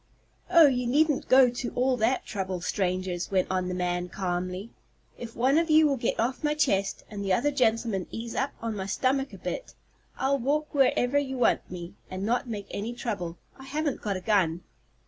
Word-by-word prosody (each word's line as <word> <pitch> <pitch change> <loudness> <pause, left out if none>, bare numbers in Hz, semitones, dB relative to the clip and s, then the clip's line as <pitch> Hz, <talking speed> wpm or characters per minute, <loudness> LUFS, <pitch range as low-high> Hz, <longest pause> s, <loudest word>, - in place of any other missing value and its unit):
"Oh, 335 -2 +8
you 250 -3 +2
needn't 295 +3 +2
go 255 -1 +7
to 245 0 -4
all 255 +1 +2
that 235 +3 +1
trouble, 190 -2 -3
strangers," 185 -1 -2
went 190 -2 +2
on 185 -1 0
the 180 - -3
man, 180 0 -1
calmly. 185 +3 -3 0.4
"If 230 -1 -9
one 265 +6 +3
of 335 0 -1
you 310 0 +6
will 285 -2 +3
get 235 -3 -2
off 245 +4 -1
my 300 0 +1
chest, 200 -10 +1
and 205 -2 -6
the 195 -1 +1
other 290 +9 +2
gentleman 225 -7 +1
ease 230 0 -6
up 270 - 0
on 225 -2 -2
my 190 -1 -4
stomach 270 +6 0
a - - -10
bit, - - -5 0.4
I'll 275 +1 +1
walk 300 +5 -1
wherever 270 -1 +3
you 265 -2 -3
want 245 - +2
me, 175 -1 -7 0.2
and 185 +1 -5
not 245 +2 0
make 205 -3 -4
any 220 +4 -4
trouble. 195 -9 -4 0.2
I 265 - -10
haven't 295 +1 -2
got 200 -4 -2
a - - -7
gun." 180 -5 +1
230 Hz, 200 wpm, -27 LUFS, 190-270 Hz, 0.4 s, Oh